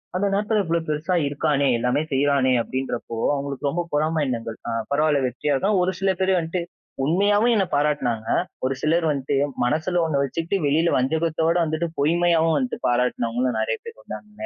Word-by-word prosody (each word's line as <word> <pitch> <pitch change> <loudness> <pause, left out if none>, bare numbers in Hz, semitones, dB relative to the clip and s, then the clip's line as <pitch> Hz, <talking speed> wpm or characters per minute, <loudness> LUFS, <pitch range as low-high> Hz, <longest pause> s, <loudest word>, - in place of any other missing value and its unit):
அந்த 190 - +1
நேரத்தில 210 +1 +1
இவ்ளோ 170 +1 +1
பெருசா 155 +4 -1
இருக்கானே! 145 -1 +1
எல்லாமே 125 +4 +1
செய்றானே! 135 -1 +2
அப்பிடின்றப்போ, 120 -2 -4 0.2
அவுங்களுக்கு 140 0 -2
ரொம்ப 175 - -1
பொறாமை 155 +2 +1
எண்ணங்கள். 115 -3 -4
ஆ, 120 - -2 0.2
பரவால்ல. 145 -1 +2
வெற்றி 125 +4 -6
ஆள் 135 - 0
தான். 205 -2 +3
ஒரு 185 +1 0
சில 195 0 +3
பேரு 190 -1 +2
வந்துட்டு 165 +2 -3 0.4
உண்மையாவும் 205 +8 +3
என்ன 195 -3 +2
பாராட்னாங்க. 140 -7 0 0.4
ஒரு 130 - +1
சிலர் 165 +2 +2
வந்ட்டு 140 0 -2 0.3
மனசில 155 +8 +1
ஒண்ணு 145 -4 0
வச்சுக்கிட்டு 165 +7 -2
வெளில 160 +4 +2
வஞ்சகத்தோட 160 +5 +1
வந்துட்டு 160 +1 -1
பொய்மையாவும் 165 +1 +2
வந்துட்டு 130 -3 -2
பாராட்டுனவுங்களும் 120 0 0
நிறைய 110 0 -1
பேர் - - -11
வந்தாங்க 105 0 -8
150 Hz, 160 wpm, -23 LUFS, 130-170 Hz, 0.4 s, தான்